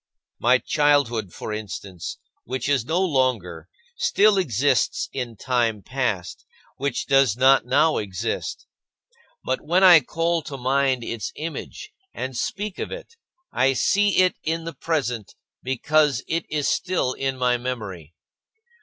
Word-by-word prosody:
My - - +4
childhood, 135 -9 +1
for 105 - -6
instance, 95 -4 -6 0.3
which 130 0 -4
is 140 -5 +1
no 165 +5 0
longer, 125 - 0 0.3
still 210 - +3
exists 145 - +1
in 125 -4 -4
time 115 -3 0
past, 125 -9 -3 0.3
which 140 -1 -2
does 135 -5 +3
not 130 -1 +5
now 160 +5 +3
exist. 100 +2 -4 0.8
But - - -1
when 175 +5 +2
I 180 -3 +9
call 165 +4 -1
to 140 -2 -7
mind 130 -1 +1
its 115 -2 -4
image 165 - -7 0.2
and 130 0 -4
speak 205 - -3
of - - -4
it, - - -9 0.4
I 135 +1 +2
see 205 +9 +2
it 185 -1 +3
in 165 +1 -2
the 165 0 -6
present 125 -10 -3 0.3
because 140 +1 +1
it 165 +1 -2
is 150 -2 -1
still 180 -8 0
in 135 0 -2
my 125 -1 +2
memory. 100 - -6
135 Hz, 135 wpm, -23 LUFS, 115-160 Hz, 0.8 s, I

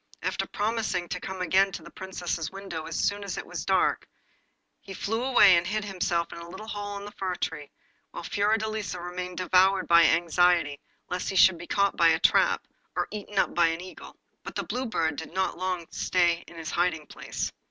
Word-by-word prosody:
After - - -1
promising 215 -4 -1
to 180 - -3
come 190 0 -6
again 190 +3 +3
to - - -6
the - - -12
Princess's 175 -4 -4
window 190 -5 -6
as 165 - -3
soon 205 0 0
as 200 - -5
it - - -5
was - - -5
dark, - - +1 0.7
he 195 - -10
flew 225 +6 -2
away, 245 -8 +7
and 170 +1 +1
hid 210 +1 -2
himself 175 -3 -1
in - - -8
a 170 0 -9
little 190 +5 -9
hole 205 -1 -5
in 200 - -8
the 205 - -8
fir 185 -3 -3
tree, 150 -4 -4 0.4
while - - -8
Fiordelisa 215 0 -1
remained 180 0 -5
devoured 185 +1 +3
by 170 0 +7
anxiety 170 -3 +3 0.3
lest 180 0 -2
he 195 - -4
should 185 -2 +6
be 170 - -9
caught 200 0 +2
in 165 -1 +6
a 160 - 0
trap, - - +3 0.3
or - - 0
eaten 210 0 -7
up - - +2
by 170 -1 +4
an 165 0 -1
eagle. 185 +1 -10 0.3
But - - -8
the - - -1
Blue 255 +1 -3
Bird 160 -9 -1
did 160 +2 -7
not 190 -2 -1
long 185 -2 -2
stay 175 -2 +1
in - - -13
his 160 -1 -5
hiding 170 -3 0
place. - - -5
180 Hz, 205 wpm, -27 LUFS, 170-200 Hz, 0.7 s, away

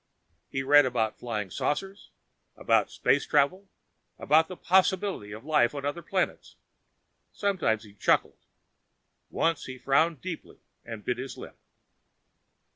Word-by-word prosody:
He 135 - -3
read 145 0 +6
about 115 -4 -1
Flying 105 -6 -4
Saucers, 195 - -3 0.5
about - - +2
space - - +1
travel, 185 +7 +1 0.5
about 160 +2 +3
the 185 - -9
possibility 190 - +1
of 110 +5 -9
life 150 -4 +2
on 140 -1 -5
other 145 +4 -3
planets. 185 +3 -2 0.8
Sometimes 175 - 0
he 105 -2 -15
chuckled. 100 - +1 0.9
Once 165 -2 0
he 130 0 -7
frowned 155 +4 +2
deeply 180 0 -7 0.3
and 115 -2 -9
bit 125 0 -1
his 135 +1 -6
lip. - - -11
145 Hz, 125 wpm, -27 LUFS, 120-170 Hz, 0.9 s, read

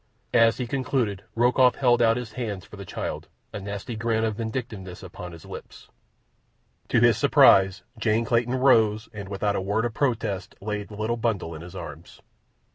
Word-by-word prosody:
As 115 -1 +5
he 125 - -2
concluded 120 -5 -1
Rokoff 125 +2 +4
held 120 -3 +3
out 115 0 +4
his 120 -3 -5
hands 105 -7 -4
for - - -12
the 100 -1 -9
child, - - -5 0.3
a - - -4
nasty 100 +4 -5
grin 110 0 0
of 110 -1 0
vindictiveness 110 -6 -5
upon 90 -1 -8
his 85 -2 -12
lips. - - -11 1.0
To - - +3
his - - +4
surprise 95 -1 +5 0.2
Jane 110 +1 +1
Clayton 120 +2 +1
rose 110 -5 +3
and, 100 -2 -7
without 100 +1 -1
a - - -1
word 105 +4 0
of 120 - -2
protest, 110 -8 -1
laid 105 0 -4
the 105 - -10
little 110 +2 -1
bundle 110 -8 -1
in 80 - -8
his 90 +2 -10
arms. 85 -3 -9
110 Hz, 180 wpm, -25 LUFS, 95-120 Hz, 1.0 s, As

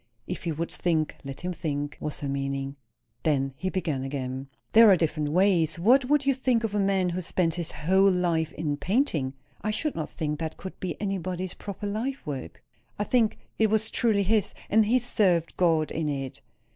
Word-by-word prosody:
If 180 - -5
he 170 - 0
would 165 +2 -3
think, 160 -3 0
let 135 -1 -7
him 180 +1 -2
think, 145 -3 -3
was 150 0 -3
her 145 - -2
meaning. 135 0 -2 0.5
Then 135 -3 +1
he 185 +7 -2
began 165 -8 -1
again. 135 -1 -4 0.3
"There 225 -1 +9
are 190 - +7
different 155 -2 0
ways. 175 -1 +3
What 250 +10 +5
would 285 +1 +2
you 275 - +4
think 255 -3 +1
of 220 -2 -1
a 210 - +1
man 195 -2 +2
who 180 +1 -2
spent 170 -1 0
his 170 -1 -4
whole 190 +6 +3
life 170 -4 +1
in 150 -2 -2
painting?" 175 - 0 0.3
"I 215 - -2
should 290 +8 -1
not 160 - -4
think 150 -1 -3
that 160 -1 -4
could 190 - -8
be 175 -5 -4
anybody's 185 -2 -3
proper 200 0 -7
life 230 +7 -3
work." 135 - -6 0.3
"I 205 - 0
think 225 0 +2 0.2
it 220 - +5
was 220 +1 +1
truly 215 -4 +2
his, 210 0 +1 0.2
and 215 0 +5
he 245 +4 +4
served 190 -9 +1
God 165 -4 +2
in 155 -1 -1
it." 135 -2 -4
175 Hz, 195 wpm, -27 LUFS, 150-205 Hz, 0.5 s, There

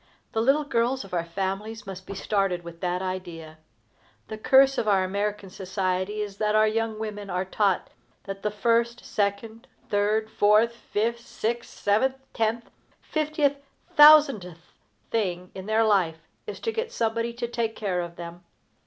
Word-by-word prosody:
The 225 - 0
little 275 +6 +3
girls 255 -1 0
of 195 - -14
our 170 -2 0
families 195 +5 -4
must 190 -1 -8
be 200 - -6
started 195 -3 0
with 170 0 -10
that 180 0 -1
idea. 170 -4 -6 0.7
The 215 - -5
curse 270 +3 +5
of 215 - -2
our 195 -2 +4
American 200 +1 -3
society 190 +2 -2
is 200 -1 -5
that 210 0 +1
our 215 0 +5
young 225 0 -1
women 210 -2 -5
are 180 +1 -1
taught 195 0 0 0.3
that 195 0 -7
the 210 - 0
first, 235 +2 0
second, 215 +2 -2 0.2
third, 210 +2 +1
fourth, 215 +3 +4
fifth, 235 +1 -2
sixth, 235 0 -3
seventh, 240 +6 +1 0.2
tenth, 225 +1 -1 0.3
fiftieth, 300 -2 0 0.4
thousandth 275 - +6 0.4
thing 180 -5 -2
in 190 +1 -8
their 220 +1 +3
life 175 -7 +1 0.2
is - - -6
to 455 - -1
get 455 +1 -3
somebody 230 - -1
to 235 0 -4
take 230 -2 -2
care 190 -4 -1
of 170 0 -7
them. 170 0 -9
210 Hz, 160 wpm, -26 LUFS, 185-230 Hz, 0.7 s, thousandth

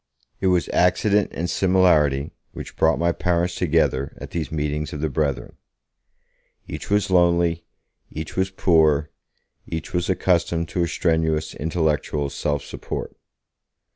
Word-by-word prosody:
It 95 - 0
was 90 -2 +2
accident 100 +3 +2
and 85 - -3
similarity 85 -8 +2 0.2
which - - -8
brought 80 0 +3
my 85 0 +2
parents 85 +1 0
together 80 -6 0
at - - -9
these 80 -4 -3
meetings 75 0 -2
of 75 - -5
the 80 -1 -1
Brethren. 70 -3 -2 1.1
Each - - -7
was 105 -1 +1
lonely, 85 -2 +2 0.4
each 80 0 -7
was 95 +1 +1
poor, 80 -5 +2 0.6
each 80 -1 -5
was 90 0 -1
accustomed 85 -2 +1
to 90 - -2
a 85 - +1
strenuous 80 -2 0
intellectual 75 -3 -1
self 70 0 -2
support. - - -6
80 Hz, 135 wpm, -22 LUFS, 75-90 Hz, 1.1 s, brought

